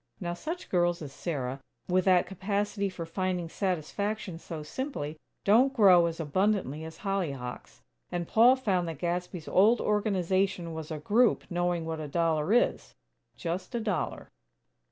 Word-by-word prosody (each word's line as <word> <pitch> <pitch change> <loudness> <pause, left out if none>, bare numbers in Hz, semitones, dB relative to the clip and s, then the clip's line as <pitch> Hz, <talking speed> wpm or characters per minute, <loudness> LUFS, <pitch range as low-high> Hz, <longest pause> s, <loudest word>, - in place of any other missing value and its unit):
Now, 175 -2 -3
such 325 - -6
girls 175 -2 +2
as 140 -2 -8
Sarah, 135 -6 -4 0.3
with 185 0 +2
that 185 -1 +5
capacity 200 +2 -2
for 175 -3 -6
finding 180 0 -2
satisfaction 190 +1 -2
so 160 -2 -7
simply, 155 - -5 0.2
don't 250 +7 +4
grow 185 -7 +7
as 165 0 -5
abundantly 165 -2 0
as 160 0 -8
hollyhocks 145 -11 -4 0.3
and 175 -1 -2
Paul 240 +4 +6
found 190 -9 0
that 165 -3 -5
Gadsby's 175 0 -3
old 215 +5 +5
Organization 190 -4 0
was 160 -1 -6
a 155 - -3
group 220 +10 +3
knowing 175 -1 0
what 160 -1 -3
a 155 - -4
dollar 160 +2 +1
is: 245 - +1 0.4
just 185 +7 -4
a - - +1
dollar. 215 -4 -3
180 Hz, 150 wpm, -29 LUFS, 165-200 Hz, 0.4 s, grow